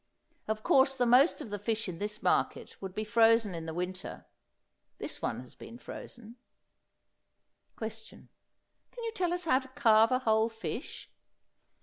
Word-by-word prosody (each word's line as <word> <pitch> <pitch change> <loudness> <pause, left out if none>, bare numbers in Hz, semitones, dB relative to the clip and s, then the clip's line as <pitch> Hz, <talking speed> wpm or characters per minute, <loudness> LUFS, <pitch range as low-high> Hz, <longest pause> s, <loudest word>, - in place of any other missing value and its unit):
Of 215 0 -2
course 270 0 +4
the 250 -2 +1
most 250 +7 +5
of 215 - -8
the 205 - -3
fish 225 +1 -2
in 170 -2 -6
this 210 +1 -4
market - - 0
would 190 -1 -6
be 215 - -2
frozen 225 -1 +4
in 165 -1 -6
the 160 - -4
winter. 180 +1 -5 0.7
This - - -7
one - - -2
has 125 - -13
been 230 - -11
frozen. 240 -1 -10 1.4
Question. 220 0 -8 0.6
Can 480 - -9
you 455 - -2
tell 365 -6 -1
us 355 0 -2
how 260 -5 +4
to 260 - -11
carve 225 -5 +4
a 255 - +4
whole 220 -3 +2
fish? 225 0 -7
225 Hz, 160 wpm, -31 LUFS, 210-255 Hz, 1.4 s, most